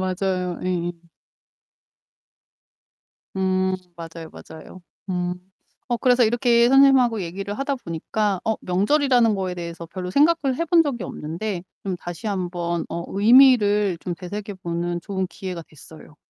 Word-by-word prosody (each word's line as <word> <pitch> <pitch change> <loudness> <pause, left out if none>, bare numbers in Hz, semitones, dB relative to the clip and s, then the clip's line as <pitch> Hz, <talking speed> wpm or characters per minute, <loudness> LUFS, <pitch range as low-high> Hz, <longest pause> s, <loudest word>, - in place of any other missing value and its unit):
맞아요. 185 -1 -2
예예. 175 -1 -1 2.4
음. 185 0 +1 0.2
맞아요, 165 -1 -9
맞아요. 160 +3 -12 0.3
음. 180 0 -1 0.5
어 240 - 0
그래서 245 0 +4
이렇게 235 +1 +3
선생님하고 265 -5 +5
얘기를 195 +4 -5
하다 275 +1 -1
보니까 195 0 -2
어 220 -1 +1
명절이라는 230 +4 +2
거에 185 -2 -2
대해서 170 -1 -7
별로 180 +1 -6
생각을 285 - +2
해 335 - 0
본 335 0 +5
적이 245 -8 -3
없는데 175 +4 -5 0.2
좀 190 -2 -3
다시 175 +6 -7
한번 175 -3 -2
어 170 - -4
의미를 210 -4 +5
좀 175 -1 -4
되새겨 200 +3 -6
보는 170 0 -2
좋은 190 -2 -3
기회가 180 -3 -7
됐어요. 155 +1 -15
190 Hz, 290 characters per minute, -23 LUFS, 175-235 Hz, 2.4 s, 선생님하고